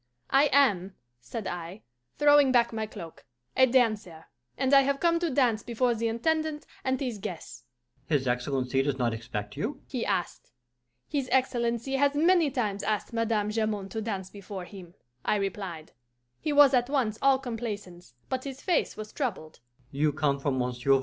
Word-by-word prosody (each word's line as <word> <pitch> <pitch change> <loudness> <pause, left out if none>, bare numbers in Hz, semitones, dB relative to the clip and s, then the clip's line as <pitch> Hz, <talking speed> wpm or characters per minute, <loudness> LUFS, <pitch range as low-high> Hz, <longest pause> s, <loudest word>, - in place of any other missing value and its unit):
'I 275 +2 +6
am,' 200 -10 +3 0.2
said 190 - -6
I, 175 +3 -6 0.3
throwing 290 -2 +6
back 235 -2 +3
my 220 -1 -2
cloak, 175 -7 -10 0.3
'a 260 0 +6
dancer, 215 -10 +1 0.3
and 265 +1 +1
I 275 - +9
have 275 0 0
come 335 +1 +3
to 340 -1 0
dance 250 -6 +2
before 240 0 0
the 230 0 -1
Intendant 310 +6 -1 0.2
and 260 -1 0
his 245 -6 -3
guests.' 185 -5 -7 0.4
'His 140 -4 +1
Excellency 125 +1 0
does 135 -1 -1
not 120 -3 0
expect 105 -2 -5
you?' 275 0 -3
he 250 -4 -3
asked. 180 -10 -2 0.6
'His 275 -3 -2
Excellency 245 0 +1
has 285 +1 +2
many 335 0 +4
times 215 -7 -2
asked 215 +2 -2
Madame 225 -2 0
Jamond 215 -3 -2
to 220 - -3
dance 195 -4 -4
before 195 -2 -7
him,' 180 -3 -12 0.3
I - - +2
replied. 190 -5 -4 0.5
He 305 - -2
was 285 -2 +7
at 245 0 +2
once 245 -7 0
all 275 -1 +5
complaisance, 205 - -6
but 260 0 -2
his 270 -1 -6
face 355 -4 0
was 215 0 -7
troubled. 190 - -4
225 Hz, 155 wpm, -28 LUFS, 190-270 Hz, 0.6 s, I